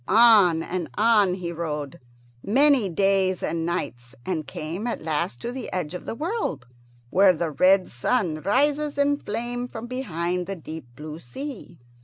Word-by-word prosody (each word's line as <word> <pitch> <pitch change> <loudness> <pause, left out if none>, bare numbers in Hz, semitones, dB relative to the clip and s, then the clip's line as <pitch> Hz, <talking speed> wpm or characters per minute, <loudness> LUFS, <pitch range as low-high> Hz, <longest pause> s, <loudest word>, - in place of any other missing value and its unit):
On 205 -7 +6
and 175 -1 -4
on 210 -4 +4
he 175 -2 -5
rode, 150 -4 -4 0.4
many 265 -1 +4
days 190 +1 +2
and 165 0 -1
nights, 125 -8 -4
and 165 -5 -2
came 170 +9 -5
at 235 - -3
last 150 -6 -2
to 240 - -3
the 260 +1 -6
edge 175 -3 -3
of 180 - -7
the - - -3
world, 305 - -3 0.5
where 190 0 +6
the 160 0 -2
red 185 +5 +4
sun 155 - -1
rises 290 - +1
in 285 0 +3
flame 240 +1 -4
from 230 -1 -7
behind 180 -8 -3
the 195 - -3
deep 160 -4 -9
blue 155 +3 -8
sea. 235 - -8
185 Hz, 160 wpm, -25 LUFS, 160-240 Hz, 0.5 s, On